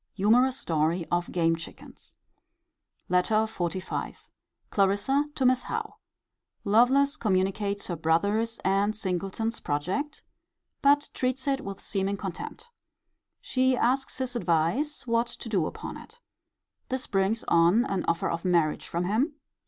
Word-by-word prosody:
Humourous 245 Hz, +6 st, +3 dB
story 165 Hz, +2 st, 0 dB
of 175 Hz, 0 st, 0 dB
game 165 Hz, -2 st, +2 dB
chickens. 165 Hz, -, -11 dB, 0.9 s
LETTER 180 Hz, +4 st, +2 dB
XLV. 185 Hz, -3 st, -4 dB, 0.5 s
Clarissa 205 Hz, +9 st, +2 dB
to 265 Hz, -, 0 dB
Miss 255 Hz, 0 st, +4 dB
Howe. -, -, -5 dB, 0.7 s
Lovelace 265 Hz, +7 st, +4 dB
communicates 200 Hz, -2 st, 0 dB
her 175 Hz, -, -3 dB
brother's 200 Hz, +9 st, +1 dB
and 200 Hz, +3 st, +2 dB
Singleton's 195 Hz, +3 st, -2 dB
project; 185 Hz, -, -2 dB, 0.6 s
but 290 Hz, +1 st, +4 dB
treats 255 Hz, +2 st, -2 dB
it 275 Hz, -1 st, +1 dB
with 195 Hz, -1 st, -7 dB
seeming 195 Hz, 0 st, -1 dB
contempt. 205 Hz, -, -7 dB, 0.7 s
She 260 Hz, -1 st, +1 dB
asks 260 Hz, +3 st, +1 dB
his 255 Hz, -1 st, -3 dB
advice 235 Hz, -, 0 dB
what 230 Hz, 0 st, +1 dB
to 235 Hz, -, -8 dB
do 190 Hz, -8 st, +1 dB
upon -, -, -7 dB
it. 460 Hz, +2 st, -14 dB, 0.7 s
This 260 Hz, 0 st, -2 dB
brings 195 Hz, +4 st, 0 dB
on 170 Hz, +8 st, +4 dB
an 195 Hz, -6 st, -1 dB
offer 170 Hz, -, +1 dB
of 170 Hz, 0 st, -3 dB
marriage 170 Hz, -4 st, +1 dB
from 170 Hz, +1 st, -2 dB
him. 245 Hz, -, 0 dB
205 Hz, 130 wpm, -27 LUFS, 180-255 Hz, 0.9 s, Miss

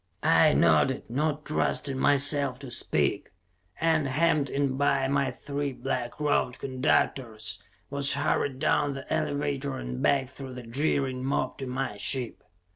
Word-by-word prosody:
I -, -, +5 dB
nodded, 85 Hz, -, +3 dB
not 150 Hz, +3 st, -1 dB
trusting 145 Hz, -2 st, 0 dB
myself 140 Hz, -2 st, +3 dB
to 135 Hz, -3 st, -7 dB
speak, -, -, 0 dB, 0.5 s
and, 160 Hz, -3 st, +2 dB
hemmed 150 Hz, 0 st, +2 dB
in 140 Hz, -2 st, 0 dB
by 140 Hz, -1 st, +2 dB
my 140 Hz, 0 st, +1 dB
three 140 Hz, -1 st, -4 dB
black 125 Hz, -1 st, -4 dB
robed 145 Hz, -4 st, +1 dB
conductors, 130 Hz, -3 st, -1 dB, 0.3 s
was 140 Hz, 0 st, +1 dB
hurried 140 Hz, -1 st, 0 dB
down 145 Hz, 0 st, +1 dB
the 135 Hz, -, -7 dB
elevator 140 Hz, -1 st, -1 dB
and 60 Hz, +1 st, -5 dB
back 135 Hz, -2 st, +2 dB
through 135 Hz, -2 st, -9 dB
the 125 Hz, -, -7 dB
jeering 130 Hz, 0 st, -1 dB
mob 130 Hz, -1 st, -1 dB
to 135 Hz, -, -4 dB
my 125 Hz, -4 st, -3 dB
ship. 115 Hz, +4 st, -1 dB
135 Hz, 140 wpm, -27 LUFS, 130-145 Hz, 0.5 s, I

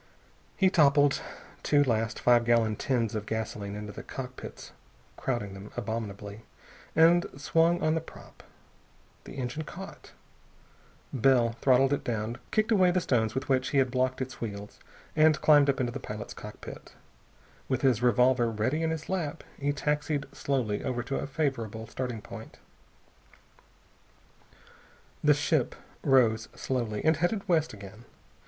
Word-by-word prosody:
He 190 Hz, -1 st, +4 dB
toppled 145 Hz, -3 st, +4 dB, 0.4 s
two 145 Hz, -1 st, +4 dB
last 115 Hz, -3 st, 0 dB
five 120 Hz, -1 st, +4 dB
gallon 115 Hz, -2 st, +3 dB
tins 115 Hz, -2 st, 0 dB
of 105 Hz, -1 st, -4 dB
gasoline 105 Hz, -2 st, -4 dB
into 105 Hz, 0 st, -6 dB
the -, -, -8 dB
cockpits 130 Hz, -1 st, -8 dB, 0.4 s
crowding 120 Hz, -7 st, -3 dB
them 95 Hz, +1 st, -9 dB
abominably 105 Hz, -2 st, -5 dB, 0.5 s
and 170 Hz, +2 st, +5 dB
swung 165 Hz, +4 st, +3 dB
on 155 Hz, -, +3 dB
the 160 Hz, -, 0 dB
prop. 165 Hz, -, -14 dB, 0.8 s
The -, -, -9 dB
engine 130 Hz, +3 st, -3 dB
caught. 190 Hz, +5 st, -10 dB, 1.0 s
Bell 125 Hz, -2 st, +4 dB
throttled 135 Hz, +1 st, +4 dB
it 145 Hz, -, -1 dB
down, 115 Hz, 0 st, -3 dB
kicked 215 Hz, +1 st, +1 dB
away 190 Hz, -4 st, +5 dB
the 180 Hz, +1 st, +2 dB
stones 115 Hz, -9 st, 0 dB
with 130 Hz, 0 st, -2 dB
which 130 Hz, -1 st, +1 dB
he 140 Hz, -, 0 dB
had 130 Hz, -2 st, +3 dB
blocked 130 Hz, +1 st, 0 dB
its 130 Hz, -, -10 dB
wheels, 105 Hz, -2 st, -6 dB, 0.4 s
and 155 Hz, 0 st, +5 dB
climbed 145 Hz, -2 st, +5 dB
up 135 Hz, -, +1 dB
into 120 Hz, -2 st, 0 dB
the -, -, -5 dB
pilot's 105 Hz, 0 st, -7 dB
cockpit. -, -, -10 dB, 0.7 s
With 130 Hz, -1 st, -1 dB
his 125 Hz, -4 st, +3 dB
revolver 125 Hz, 0 st, +4 dB
ready 115 Hz, +8 st, -1 dB
in 160 Hz, -, +1 dB
his 160 Hz, -2 st, -4 dB
lap 165 Hz, -4 st, -3 dB, 0.2 s
he 145 Hz, 0 st, +1 dB
taxied 150 Hz, 0 st, -1 dB
slowly 120 Hz, -7 st, -1 dB
over 120 Hz, -1 st, -2 dB
to 135 Hz, +3 st, -3 dB
a -, -, -4 dB
favorable 125 Hz, -7 st, -2 dB
starting 120 Hz, -1 st, -5 dB
point. 115 Hz, -1 st, -10 dB, 2.7 s
The 150 Hz, -1 st, +6 dB
ship 145 Hz, -2 st, 0 dB, 0.3 s
rose 115 Hz, -5 st, +3 dB
slowly, 115 Hz, -5 st, -2 dB
and 160 Hz, -1 st, +4 dB
headed 195 Hz, +5 st, -1 dB
west 165 Hz, -4 st, +2 dB
again. 105 Hz, +2 st, -11 dB
130 Hz, 145 wpm, -29 LUFS, 110-150 Hz, 2.7 s, The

